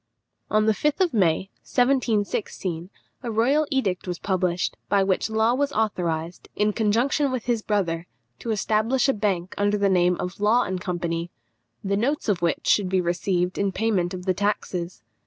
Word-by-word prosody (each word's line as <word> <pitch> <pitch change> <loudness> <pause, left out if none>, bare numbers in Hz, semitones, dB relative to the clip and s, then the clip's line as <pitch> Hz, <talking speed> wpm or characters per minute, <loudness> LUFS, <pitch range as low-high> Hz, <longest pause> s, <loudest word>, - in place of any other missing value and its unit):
On 215 0 +3
the 220 - +4
5th 300 - 0
of 365 -3 +2
May, 190 -2 +1
1716, 210 -8 0 0.3
a 245 - -4
royal 270 +8 +2
edict 200 -11 -1
was 180 -1 -3
published, 185 -1 -1
by 200 -1 +3
which 190 +2 0
Law 220 +2 +2
was 285 +2 0
authorised, 175 -6 -2
in 210 0 +1
conjunction 240 +7 +1
with 255 -3 -3
his 235 -2 0
brother, 175 -6 -1 0.3
to 235 - -6
establish 220 +5 +1
a 270 - +3
bank 195 -5 -1
under 205 +1 +2
the 200 -1 +2
name 180 -1 +3
of 180 +3 -5
Law 220 +4 +4
and 185 -1 -3
Company, 170 -2 -2 0.5
the 200 0 0
notes 275 +8 0
of 195 -5 +1
which 170 -1 0
should 200 -3 +3
be 190 0 +2
received 180 +1 0
in 200 -1 +1
payment 190 -3 0
of 180 0 -8
the 185 - +2
taxes. 185 -4 -2
200 Hz, 175 wpm, -24 LUFS, 180-225 Hz, 0.5 s, the